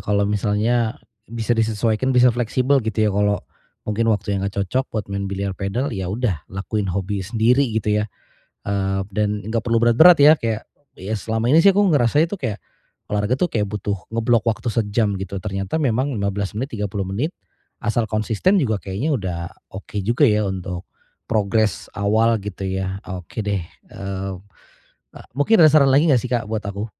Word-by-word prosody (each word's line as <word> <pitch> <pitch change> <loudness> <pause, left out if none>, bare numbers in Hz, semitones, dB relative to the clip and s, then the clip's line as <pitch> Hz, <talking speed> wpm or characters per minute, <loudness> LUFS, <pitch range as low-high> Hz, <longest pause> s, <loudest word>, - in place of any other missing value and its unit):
kalau 100 0 +1
misalnya, 110 +4 0 0.3
bisa 115 0 -1
disesuaikan 115 +2 0
bisa 125 -2 +5
fleksibel 125 +3 +1
gitu 110 0 0
ya - - +2
kalau, 105 0 +2 0.5
mungkin 115 +2 +1
waktunya 100 -1 -1
enggak 100 0 -1
cocok 130 +8 0
buat 110 -2 -3
main 100 0 -2
biliar 100 0 -3
padel 110 +8 -2
ya 95 -1 -3
udah 100 - -1
lakuin 95 +1 -3
hobi 95 +1 -2
sendiri 115 +6 +2 0.2
gitu 105 -1 0
ya, - - -2 0.6
eee, 95 -1 0
dan 105 0 0
nggak 115 0 -1
perlu 115 -1 +1
berat-berat 140 +10 +7
ya 150 +2 +8
kayak, 115 -5 -3 0.3
ya 100 +4 -3
selama 110 +3 -2
ini 160 +5 +5
sih 200 - +8
aku 195 - +1 0.2
ngerasa 120 +2 +3
itu 205 - -4
kayak, 120 - -4 0.5
olahraga 105 +5 0
tuh 180 - +2
kayak 110 -9 -1
butuh 100 -1 -2 0.2
ngeblok 115 0 +2
waktu 115 +1 -1
sejam 105 -1 0
gitu 95 0 -5
ternyata 95 - -3
memang 135 0 +1
15 100 0 -2
menit, 130 -2 -4
30 100 -2 -3
menit, 125 - -2 0.5
asal 115 +2 0
konsisten 110 - +2
juga 110 -7 +1
kayaknya 110 +11 -1
udah 95 -7 -3 0.3
oke 100 +2 -10
juga 120 +8 +3
ya 105 -1 +2
untuk, 95 -2 -4 0.4
progress 110 -1 0
awal 110 +3 +2
gitu 100 -1 -5
ya 95 0 -3
oke 90 +2 -7
deh, 100 -4 -1 0.2
eee, 95 0 -5 0.8
e - - -13 0.2
mungkin 145 +11 +3
ada 160 - +8
saran 140 -3 +5
lagi 145 +5 +4
enggak 130 -6 +3
sih 125 - -5
Kak 120 -3 0
buat 110 0 -3
aku? 100 +2 -4
110 Hz, 175 wpm, -21 LUFS, 100-120 Hz, 0.8 s, ya